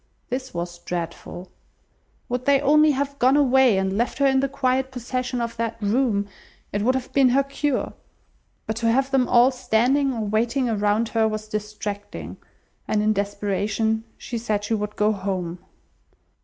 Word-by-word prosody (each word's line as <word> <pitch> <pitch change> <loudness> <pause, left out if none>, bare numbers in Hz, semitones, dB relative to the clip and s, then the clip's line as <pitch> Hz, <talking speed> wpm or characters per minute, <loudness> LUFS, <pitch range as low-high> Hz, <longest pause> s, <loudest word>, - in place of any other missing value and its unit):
This 260 +1 -4
was 175 0 -5
dreadful. 175 +1 -6 0.8
Would 250 +1 -3
they 280 -1 +5
only 300 +2 +5
have 280 0 -1
gone 260 +3 +4
away, 265 -6 +4
and 190 0 0
left 240 - -1
her 280 - +2
in 265 -1 +4
the 275 +1 0
quiet 260 -1 0
possession 250 0 -3
of 235 -1 -3
that 230 0 -2
room 210 -1 +1 0.5
it 205 - 0
would 255 +5 +2
have 260 -1 -4
been 270 -2 +5
her 270 +3 +3
cure; 275 0 -2 0.7
but 220 - -3
to 230 0 +2
have 270 +3 +1
them 265 -2 +3
all 245 +2 +6
standing 255 +3 +1
or 235 -3 -3
waiting 230 +5 0
around 215 0 +1
her 225 -1 +2
was 215 0 -4
distracting, 210 -1 -5 0.5
and 210 -1 +1
in 215 0 +3
desperation, 205 +2 -1
she 235 -3 -5
said 215 -3 -1
she 210 - -2
would 210 -1 -2
go 210 +1 +2
home. 185 -4 -3
230 Hz, 170 wpm, -23 LUFS, 210-260 Hz, 0.8 s, all